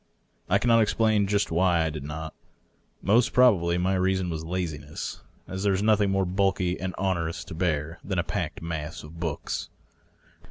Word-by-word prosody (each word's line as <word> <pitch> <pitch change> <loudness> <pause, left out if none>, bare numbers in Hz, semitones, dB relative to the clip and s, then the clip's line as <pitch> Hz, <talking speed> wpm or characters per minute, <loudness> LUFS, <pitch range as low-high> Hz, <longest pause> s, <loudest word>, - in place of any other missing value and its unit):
I - - +5
cannot 115 -1 +4
explain 110 -1 +2
just 100 -2 +1
why 85 0 +3
I 80 - -1
did 75 -2 -6
not; 80 +2 -6 0.7
most 115 +4 +3
probably 95 -9 +4
my 90 +2 +1
reason 95 -1 +1
was 80 -1 -4
lazi 85 -3 -3
ness, - - -7 0.3
as 95 0 -5
there 100 -1 +2
is 95 +2 0
nothing 105 -2 +4
more 95 0 +1
bulky 95 -1 0
and 95 -2 -4
onerous 85 -3 -1
to - - -9
bear 80 -1 -1
than 95 -1 -3
a 85 - +2
packed 80 - -4
mass 80 -2 -5
of 80 +2 -11
books. 80 -4 -3
90 Hz, 175 wpm, -26 LUFS, 80-100 Hz, 0.7 s, I